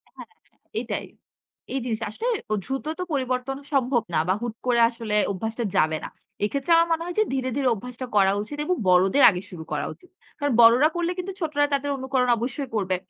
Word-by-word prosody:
হ্যাঁ, - - -10 0.2
হ্যাঁ। - - -40 0.2
এটাই। - - -4 0.7
এই 270 - 0
জিনিসটা 225 -2 -2
আসলে 465 - -4 0.4
দ্রুত 270 +2 -4
তো - - -1
পরিবর্তন 260 0 -1 0.2
সম্ভব 250 -3 +2
না 155 - +3
বা 185 - +3
হুট 235 -2 -4
করে 240 -1 +3
আসলে 230 -3 -4 0.2
অভ্যাসটা 225 +5 -3
যাবে 155 0 +3
না। - - -6 0.4
এক্ষেত্রে 280 +8 -2
আমার - - -4
মনে - - -4
হয় 355 - -5
যে - - +6
ধীরে, 260 -1 -1
ধীরে 270 -2 +1
অভ্যাসটা 250 +4 -7
করা 195 -1 +5
উচিত 290 +8 -7
এবং 365 - +1
বড়দের 190 +9 +4
আগে 180 -2 -3
শুরু 170 -4 -8
করা - - -1
উচিত। 360 - -22 0.3
কারণ 285 -3 0
বড়রা 240 +6 +7
করলে 345 0 0
কিন্তু 380 +2 -4
ছোটরা 305 -3 0
তাদের 285 +1 0
অনুকরণ 260 -1 0
অবশ্যই 255 +3 -4
করবে। 190 -3 0
250 Hz, 195 wpm, -24 LUFS, 220-280 Hz, 0.7 s, বড়রা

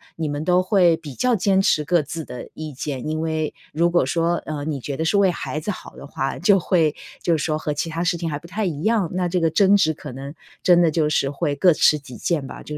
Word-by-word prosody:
你 160 -2 -3
们 145 +1 -3
都 180 +1 +3
会 180 -4 +4
比 150 -5 -9
较 250 - +1
坚 195 -1 +2
持 155 -5 +2
各 175 0 +3
自 155 +2 -6
的 125 - -8
意 155 -2 -6
见。 135 +1 -5
因 155 +1 -2
为 160 -1 -2 0.2
如 170 +2 +1
果 175 -5 +3
说， 170 +3 +1
呃， 150 -2 -4
你 150 -3 -3
觉 140 +2 -5
得 160 - -1
是 200 +5 +2
为 195 -2 +4
孩 155 -3 -3
子 165 - -6
好 205 - -6
的 - - -10
话， 135 0 -3
就 195 +1 +4
会 165 -4 +1 0.3
就 170 -2 +2
是 - - -3
说 155 -1 -1
和 150 -2 -3
其 160 +2 -2
它 165 +2 -2
事 170 0 +1
情 165 - -4
还 145 -2 -3
不 170 - -14
太 210 +3 -2
一 155 -4 -3
样， 215 -3 +2
那 180 -1 0
这 180 +1 0
个 165 -2 +1
争 200 +3 +5
执 160 -5 +2
可 145 -2 -9
能 140 +2 -7 0.3
真 175 -1 +5
的 170 - +4
就 155 -1 0
是 135 -2 +1
会 145 +1 -2
各 175 +3 +4
执 150 0 +4
己 130 -4 -12
见 150 -6 -1
吧， - - -9
就 150 - -7
160 Hz, 290 characters per minute, -22 LUFS, 150-180 Hz, 0.3 s, 争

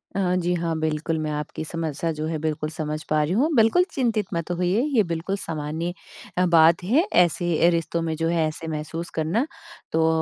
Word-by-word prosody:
हाँ, 180 -2 +1
जी। 175 0 0
हाँ, 165 -1 -1
बिल्कुल 160 +1 -1
मैं 155 -1 -2
आपकी 150 +1 -4
समस्या 165 0 -2
जो 155 - -2
है, 160 -1 -2
बिल्कुल 155 -1 -2
समझ 155 0 -4
पा 155 0 +3
रही 155 - -2
हूँ। 265 +10 +3
बिल्कुल 225 +10 +5
चिंतित 230 -6 0
मत 170 +1 -2
होइए, 180 +5 +1
ये 215 - +5
बिल्कुल 170 +3 -2
सामान्य 160 +1 -3 0.4
अ, 180 - +4
बात 165 0 +5
है, 260 - +3
ऐसे 175 0 +3 0.2
अ, - - +7
रिश्तों 170 0 -1
में 160 -1 -2
जो 165 +1 -1
है 165 -2 +2
ऐसे 155 +1 -6
महसूस 160 +2 -4
करना। 165 - +1 0.5
तो 160 0 +3
165 Hz, 200 wpm, -24 LUFS, 155-180 Hz, 0.5 s, अ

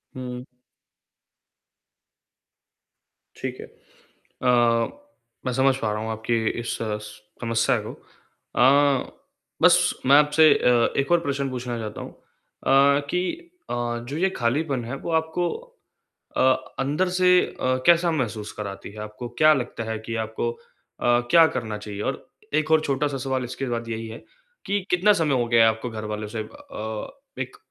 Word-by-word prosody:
हुँ। 125 -1 -6 2.9
ठीक - - -5
है। - - -8 0.5
अ, 125 -1 -1 0.9
मैं 125 - 0
समझ 135 +1 +3
पा 110 -5 -1
रहा 105 +1 -3
हूँ 110 - -4
आपकी 110 +1 -1 0.2
इस 120 - -3
स 105 -1 -2 0.4
समस्या 115 -1 +1
को। - - -6
अ, 140 +1 0 0.5
बस - - +7 0.3
मैं 140 +2 +7
आपसे 150 +1 +5
अ, 120 -1 +3
एक 135 +5 -1
और 175 - +5
प्रश्न 140 -3 -2
पूछना 125 -2 -4
चाहता 110 -2 -6
हूँ। - - -8
अ, 140 +1 +1
कि 180 - +1 0.5
अ, - - -1 0.3
जो 140 - -4
ये 190 +4 +2
खालीपन 130 +1 0
है 120 +4 -5
वो 155 - -6
आपको 160 +2 -2 0.9
अ, - - +1 0.4
अंदर 150 +7 0
से 180 0 +5 0.3
अ, 130 0 +1
कैसा 170 0 +5
महसूस 110 -8 -3
कराती 100 -2 -6
है? 105 - -12
आपको 105 +3 -7
क्या 155 0 +7
लगता 120 -3 -4
है 110 - -2
कि 115 - -4
आपको 110 +2 -2
अ, - - -17 0.7
क्या 165 +2 +8
करना 110 -4 -3
चाहिए? 105 -1 -7
और 135 - -3 0.3
एक 155 0 +1
और 160 - +6
छोटा-सा 140 0 0
सवाल 130 -1 -2
इसके 135 +2 -5
बाद 115 -1 -3
यही 115 0 -4
है 110 - -8 0.5
कि 200 +1 0
कितना 185 +4 +4
समय 150 -3 +2
हो - - -2
गया 115 -1 +5
है 115 - +6
आपको 110 +2 -5
घरवालों 105 -1 -5
से 110 +1 -5
अ, 110 0 -7 0.3
एक 425 - -5
125 Hz, 155 wpm, -24 LUFS, 115-145 Hz, 2.9 s, क्या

